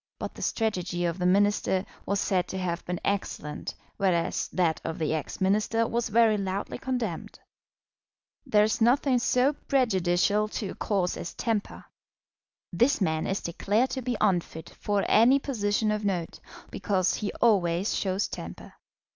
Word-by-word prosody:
But - - -5
the - - -11
strategy 180 -6 -1
of 170 +1 -2
the 180 - +1
Minister 200 0 +2 0.2
was 200 0 +1
said 185 -3 0
to 190 - -5
have 175 -2 -2
been 180 0 -3
excellent, 190 -6 -3 0.2
whereas 180 -4 0
that 170 -4 0
of 165 - -4
the 155 -1 -1
ex 155 -2 -4
Minister 210 +4 +2
was 235 +1 -1
very 220 -1 +4
loudly 195 +1 -3
condemned. 240 -10 -3 1.1
There 210 -1 +3
is 220 +2 0
nothing 250 +2 +3
so 255 +3 +2
prejudicial 210 - +1
to 210 -1 -4
a - - -5
cause 190 -4 -1
as 170 - -6
temper. 225 -4 -2 0.9
This 245 - +3
man 160 -5 0
is 195 - -1
declared 205 +8 0
to 260 - -3
be 245 -2 -2
unfit 175 -5 0
for 205 -1 -1
any 235 +5 +6
position 215 -6 0
of 210 0 -2
note, 180 -5 -2 0.3
because 190 -3 0
he 210 - -3
always 190 -4 +2
shows 190 +1 0
temper. - - -8
200 Hz, 155 wpm, -27 LUFS, 180-225 Hz, 1.1 s, any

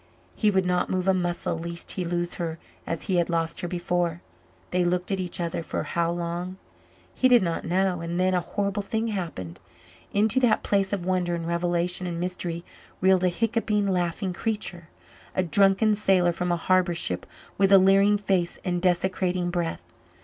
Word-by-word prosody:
He 215 - +2
would 190 -2 +2
not 180 0 +1
move 185 0 -1
a 190 - +5
muscle 175 -2 -1
lest 170 +1 -4
he 185 - -2
lose 175 0 -2
her 165 -1 -3 0.3
as 165 - -3
he 185 - 0
had 170 0 +1
lost 165 -1 -1
her 175 - -2
before. 175 -1 -1 0.5
They 180 0 +2
looked 180 +2 0
at 195 - 0
each 180 -1 -3
other 170 -1 -2
for - - -3
how 170 -1 0
long? 175 +2 -3 0.6
He 260 - +3
did 245 -5 +6
not 170 -2 -2
know; 185 +1 +1
and 170 +1 -3
then 185 0 +2
a 180 - +3
horrible 200 +2 -2
thing 220 +3 -2
happened. 165 - -5 0.5
Into 210 +4 +2
that 245 -3 +3
place 195 -1 +1
of 195 -4 -2
wonder 180 -2 0
and 165 -1 -4
revelation 175 +1 0
and 170 -1 -4
mystery 175 -1 -3 0.3
reeled 190 -1 +4
a 180 - +4
hiccoughing, 215 +1 0
laughing 180 +1 -1
creature, 180 -5 -3 0.5
a 185 - +2
drunken 195 +5 +4
sailor 190 -4 +3
from 180 +1 -2
a 175 - +1
harbour 180 0 +2
ship, 90 - -2 0.3
with 195 0 +4
a 195 - +10
leering 195 +2 +5
face 190 -4 0
and 175 -1 -1
desecrating 180 0 0
breath. 175 -2 -2
180 Hz, 185 wpm, -26 LUFS, 170-195 Hz, 0.6 s, a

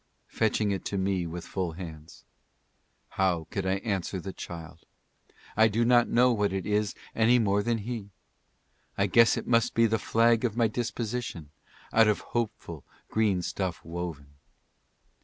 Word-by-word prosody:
fetching 110 -2 +1
it 95 - -2
to 100 - -3
me 95 -2 0
with 85 +1 -6
full 90 -4 -3
hands; 80 -2 -10 0.8
How 90 -4 0
could 95 -1 -2
I 95 - +2
answer 95 -3 -2
the 95 +2 -6
child? 85 -1 -9 0.7
I 110 +1 +6
do 115 +2 +1
not 120 0 +5
know 125 +1 +4
what 105 -3 +1
it 95 -1 -3
is 105 0 0 0.2
any 115 +2 +4
more 105 -3 +2
than 115 +2 0
he. 110 -1 -5 0.9
"I - - +3
guess 115 -1 +5
it - - -4
must 115 -2 +2
be 115 - +5
the 110 0 +1
flag 115 +1 +3
of 115 -2 -1
my 115 -2 +4
disposition, 115 -7 -4 0.4
out 115 -1 +6
of 105 - +2
hopeful 105 - -4 0.3
green 105 -5 +1
stuff 95 0 -3
woven. 80 -4 -6
105 Hz, 160 wpm, -28 LUFS, 90-115 Hz, 0.9 s, I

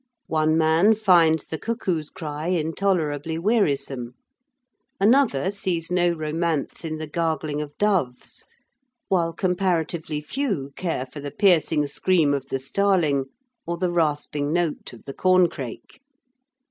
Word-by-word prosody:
One 155 0 +3
man 165 +7 +4
finds 170 -7 +4
the 160 - -6
cuckoo's 185 -9 -2
cry 150 -1 -6
intolerably 160 -3 0
wearisome. 140 - 0 0.8
Another 205 - +3
sees 180 -4 -3
no 175 -1 +3
romance 160 -1 -2
in 155 -1 -4
the 155 - -5
gargling 155 -1 -2
of 145 -1 -8
doves, 185 -12 -1 0.7
while 170 -4 +2
comparatively 175 -4 -1
few 155 - -3
care 165 -8 -2
for 135 +3 -10
the 145 0 -5
piercing 160 -4 +3
scream 155 0 +2
of 135 -1 -3
the 135 - -2
starling 150 -1 +1 0.4
or 170 0 -2
the 180 0 0
rasping 150 -3 0
note 170 -2 -1
of 120 - -15
the 135 - -6
corncrake. 175 - 0
160 Hz, 125 wpm, -24 LUFS, 150-185 Hz, 0.8 s, man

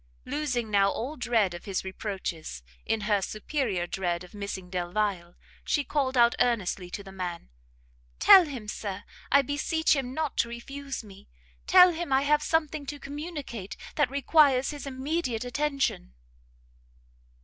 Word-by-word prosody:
Losing 255 -5 -2
now 200 -1 +4
all 260 +9 -4
dread 230 - +1
of 175 - -9
his 195 -2 -2
reproaches, 185 - -5 0.2
in 225 -1 0
her 205 -1 +1
superior 215 - -2
dread 175 -1 -2
of 180 - -14
missing 200 -3 -5
Delvile, 180 0 -2 0.3
she 290 - +1
called 275 -3 -1
out 235 0 +6
earnestly 195 -6 0
to 200 - -6
the 195 - -11
man, 180 - -5 0.7
"Tell 365 - +8
him, 255 -8 -7
Sir, 200 -2 -5 0.3
I 280 +1 +6
beseech 300 +3 +1
him 265 -3 -2
not 315 -3 -2
to 235 - +2
refuse 275 +3 -6
me! 200 -1 -15 0.4
tell 360 -1 +8
him 340 -2 -4
I 265 +1 +4
have 300 +1 +3
something 310 -2 0
to 290 0 -5
communicate 285 - -6 0.2
that 295 -5 +2
requires 280 -1 +3
his 290 -1 -7
immediate 260 -3 -2
attention!" 275 - -1
245 Hz, 150 wpm, -28 LUFS, 195-285 Hz, 0.7 s, Tell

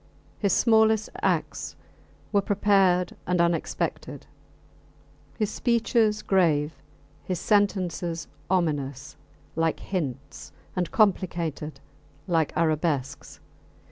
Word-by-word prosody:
His 200 -2 +1
smallest 220 -1 +4
acts - - -1 0.6
were 205 - +3
prepared 195 -3 +2
and 180 0 +1
unexpected, 170 -1 -1 1.1
his 215 -2 0
speeches 230 -3 +1
grave, 160 -5 +2 0.5
his 185 -2 -3
sentences 185 -5 0 0.2
ominous 145 -6 -1 0.4
like 165 0 0
hints 140 -6 -5 0.2
and 180 -2 -1
complicated 170 -7 0 0.5
like 165 -4 +1
arabesques. 155 -4 -1
175 Hz, 80 wpm, -26 LUFS, 155-205 Hz, 1.1 s, smallest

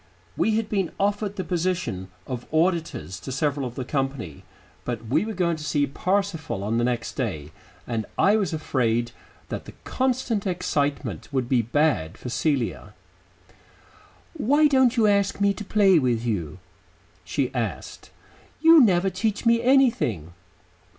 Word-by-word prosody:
We 220 - +1
had 225 -1 0
been 195 -5 -1
offered 205 0 0
the 185 - -3
position 175 - -2 0.2
of 125 -2 -6
auditors 160 - 0
to 130 - -7
several 140 0 -1
of 120 - -10
the 130 - -4
company, 135 - -3 0.4
but 120 -2 -4
we 150 - +1
were 220 -1 -5
going 170 -3 0
to 155 - -8
see 150 -2 +1
Parsifal 165 - -2
on 110 +3 0
the - - +1
next 120 -1 -1
day, 80 - -4 0.3
and 115 -3 -3
I 200 +2 +4
was 200 -7 0
afraid 120 -7 0 0.4
that - - -5
the - - -11
constant 250 -5 -1
excitement 145 - -2
would 130 -3 -1
be 125 -2 +3
bad 115 - 0
for 125 - -7
Celia. 130 0 -1 1.4
"Why 295 0 +3
don't 260 -4 +4
you 225 - +4
ask 200 -1 +2
me 200 0 +3
to 210 - -7
play 195 -4 +4
with 120 -4 0
you?" 90 -9 -2 0.7
she 130 -2 -2
asked. 110 - -4 0.5
"You 325 +1 +8
never 190 -3 +3
teach 210 +4 -2
me 230 0 +4
anything." 235 - +2
155 Hz, 150 wpm, -24 LUFS, -, 1.4 s, You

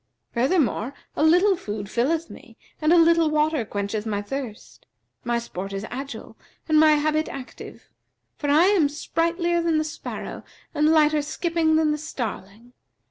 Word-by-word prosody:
'[FN#374] - - -44
Furthermore 260 - +1 0.2
a - - -2
little 360 +5 +5
food 205 - -6
filleth 310 +10 0
me - - -14 0.2
and 310 +1 +3
a 350 - +6
little 335 -1 +5
water 305 -3 +1
quencheth 205 +1 -4
my 205 -2 -1
thirst; 230 +1 -7 0.4
my 240 0 0
sport 195 -4 -6
is 195 +2 -4
agile 275 +2 -7 0.3
and 310 -1 +4
my 310 0 +6
habit 310 +1 0
active; 265 -2 -10 0.5
for 290 - -3
I 300 +4 +5
am 375 -7 +3
sprightlier 340 +3 -1
than 335 -2 +1
the 310 - +1
sparrow 310 - -7 0.3
and 300 0 +2
lighter 305 -1 +4
skipping 320 +1 0
than 315 -1 +3
the 300 - -2
starling. 235 -5 -6
300 Hz, 160 wpm, -24 LUFS, 240-320 Hz, 0.5 s, a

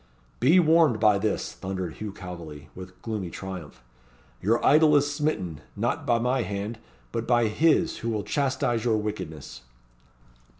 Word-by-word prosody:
"Be 155 +9 +5
warned 160 -8 +4
by 105 -2 +4
this," 105 0 -1
thundered 95 -3 -4
Hugh 105 -1 -5
Calveley, 85 -6 -9
with 95 0 -11
gloomy 105 -6 -3
triumph. 85 -9 -8 0.6
"Your 115 +5 +1
idol 150 +1 +6
is 145 0 +3
smitten 95 - -2
not 120 +8 -2
by 120 -1 +4
my 125 +2 +1
hand, 105 +2 -4 0.3
but 115 -1 -3
by 120 -1 +4
His 160 +8 +2
who 115 - -3
will 105 -2 -1
chastise 130 -5 0
your 115 -3 +2
wickedness." 80 - -5
110 Hz, 145 wpm, -26 LUFS, 95-130 Hz, 0.6 s, idol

